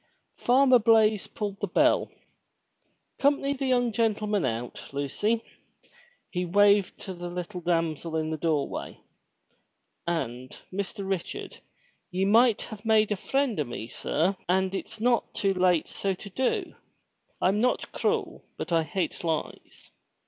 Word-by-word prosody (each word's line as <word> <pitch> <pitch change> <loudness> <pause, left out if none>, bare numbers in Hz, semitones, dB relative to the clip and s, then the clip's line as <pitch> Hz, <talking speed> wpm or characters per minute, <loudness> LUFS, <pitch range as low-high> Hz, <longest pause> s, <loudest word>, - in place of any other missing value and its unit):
Farmer 255 0 +5
Blaize 220 -2 +4
pulled 205 -2 -5
the 205 - -1
bell. 175 - +3 0.6
" - - -47
'Comp'ny 280 0 +2
the 270 -1 -3
young 245 -2 +2
gentle 215 -1 +1
man 205 -5 +1
out, 120 0 -4
Lucy," 205 - -1 0.9
he 180 -1 -1
waved 200 +2 +3
to 190 - -6
the 175 0 -6
little 180 +1 -5
damsel 165 -2 -1
in 155 0 -1
the 160 - -2
doorway. 155 -3 -2 1.1
"And, 130 -7 -3 0.2
Mr. 200 +1 -4
Richard, 190 -3 -4 0.5
ye 190 0 0
might 225 +2 +4
have 215 -2 -9
made 220 -1 +3
a - - +2
friend 270 - 0
o' - - +2
me, 120 -3 -6
sir, 175 +11 0
and 190 +1 +2
it's 220 +3 -5
not 240 +1 +1
too 195 -1 +1
late 180 -3 +2
so 195 -1 -2
to 200 +2 -11
do. 255 +6 -1 0.7
I'm 195 +3 +2
not 250 +1 0
cruel, - - -1
but - - -5
I 165 -1 +4
hate 165 +5 -3
lies. 160 -2 -4
195 Hz, 145 wpm, -27 LUFS, 170-220 Hz, 1.1 s, Farmer